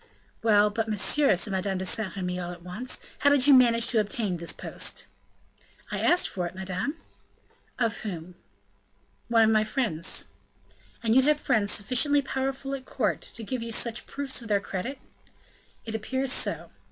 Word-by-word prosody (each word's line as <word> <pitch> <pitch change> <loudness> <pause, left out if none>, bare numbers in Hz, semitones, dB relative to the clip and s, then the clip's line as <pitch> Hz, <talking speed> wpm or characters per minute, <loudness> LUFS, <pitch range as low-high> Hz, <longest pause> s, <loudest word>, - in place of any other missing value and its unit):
"Well, 210 -2 +4
but, 225 +2 -2
monsieur," 215 +3 +3
said 200 +3 -2
Madame 190 0 -1
de 185 - -3
Saint 205 +1 -1
Remy, 180 -1 -3
all 175 0 -4
at 175 -1 -11
once, 195 +9 -5 0.2
"how 285 - +5
did 285 -3 +4
you 290 - +8
manage 235 -3 +6
to 230 - +4
obtain 205 -3 -1
this 170 0 -3
post?" - - -3 0.9
"I - - -2
asked 355 - +4
for 180 -2 -3
it, 175 - -10
madame." 190 - -3 0.8
"Of 230 -4 0
whom?" 180 -4 -6 0.9
"One 230 -1 +5
of 220 - +4
my 215 -1 +4
friends." 215 -7 -1 0.7
"And 225 -1 +2
you 265 - +7
have 295 +2 +3
friends 205 -7 +1
sufficiently 275 +8 +2
powerful 270 0 -3
at 265 -1 -5
court 225 -5 -1
to 230 - -7
give 250 +3 -3
you 230 0 -5
such 230 +1 -1
proofs 280 -2 -2
of 230 - -9
their 205 -2 +2
credit?" 200 +7 -5 0.9
"It 225 - -5
appears 260 +4 -1
so." - - 0
220 Hz, 175 wpm, -27 LUFS, 195-260 Hz, 0.9 s, you